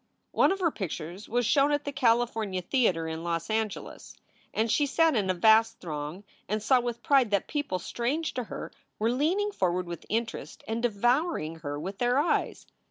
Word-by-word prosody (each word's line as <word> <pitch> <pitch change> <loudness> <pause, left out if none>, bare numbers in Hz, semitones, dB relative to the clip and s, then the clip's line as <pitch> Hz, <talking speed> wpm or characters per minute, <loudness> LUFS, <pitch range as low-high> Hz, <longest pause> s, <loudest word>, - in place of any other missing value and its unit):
One - - +4
of 390 0 -2
her 335 -3 +2
pictures 175 - -6
was 245 +1 +1
shown 275 +5 +4
at 290 0 0
the 285 - -2
California 230 -7 +1
Theater 180 -7 +1
in 160 0 -5
Los 165 +1 -2
Angeles, 220 -2 -3 0.4
and 220 +1 0
she 290 +4 +3
sat 325 +2 +3
in 200 -4 +1
a 185 - +2
vast 220 +4 +4
throng 155 +2 -5 0.3
and 215 +1 -1
saw 255 +3 +4
with 240 -1 -4
pride 270 -5 +4
that 200 -2 +1
people 290 -10 -2
strange 260 - -2
to 250 -2 -3
her - - -7 0.3
were 225 +2 +1
leaning 350 +11 +1
forward 180 - 0
with 170 -2 -8
interest 230 +1 -3
and 225 +1 -2
devouring 240 - +1
her 145 -2 -5
with 195 +5 -6
their 245 +1 +2
eyes. 295 +4 0
225 Hz, 185 wpm, -28 LUFS, 185-265 Hz, 0.4 s, One